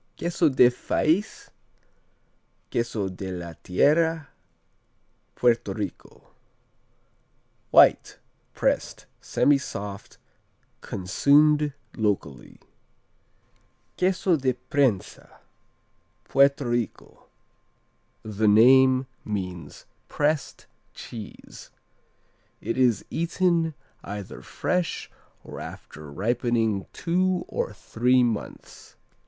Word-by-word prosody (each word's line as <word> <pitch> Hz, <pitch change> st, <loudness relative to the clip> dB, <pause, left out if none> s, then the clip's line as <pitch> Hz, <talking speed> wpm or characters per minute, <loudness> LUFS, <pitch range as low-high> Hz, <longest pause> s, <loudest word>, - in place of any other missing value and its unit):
Queso 170 Hz, -1 st, +1 dB
del 125 Hz, -2 st, +5 dB
Fais, 160 Hz, -, -1 dB, 1.2 s
Queso 115 Hz, -4 st, -1 dB
de 95 Hz, 0 st, -6 dB
la 85 Hz, -2 st, -6 dB
Tierra 160 Hz, -, +2 dB, 1.1 s
Puerto 120 Hz, -1 st, +1 dB
Rico -, -, -8 dB, 1.4 s
White; -, -, +5 dB, 0.4 s
pressed; -, -, -1 dB, 0.2 s
semisoft 105 Hz, -8 st, -1 dB, 0.6 s
Consumed 145 Hz, +10 st, +2 dB, 0.2 s
locally, 100 Hz, -, -3 dB, 1.4 s
Queso 185 Hz, -1 st, +1 dB
de 130 Hz, -3 st, 0 dB, 0.2 s
Prensa 135 Hz, -, -1 dB, 0.9 s
Puerto 140 Hz, +3 st, +3 dB
Rico 120 Hz, -4 st, -4 dB, 1.0 s
The 110 Hz, 0 st, -1 dB
name 130 Hz, +4 st, +6 dB, 0.2 s
means 90 Hz, -7 st, -6 dB, 0.2 s
pressed 150 Hz, -1 st, -1 dB, 0.3 s
cheese. 110 Hz, -4 st, -10 dB, 0.9 s
It 115 Hz, -, -3 dB
is 125 Hz, -4 st, +2 dB
eaten 170 Hz, -1 st, 0 dB, 0.3 s
either 100 Hz, -1 st, -7 dB
fresh 180 Hz, -2 st, -3 dB, 0.3 s
or -, -, -9 dB
after 75 Hz, -1 st, -10 dB
ripening 115 Hz, -, -1 dB
two 180 Hz, +1 st, 0 dB
or -, -, -3 dB
three 125 Hz, +2 st, +1 dB
months. 115 Hz, -3 st, -5 dB
125 Hz, 75 wpm, -25 LUFS, 105-150 Hz, 1.4 s, name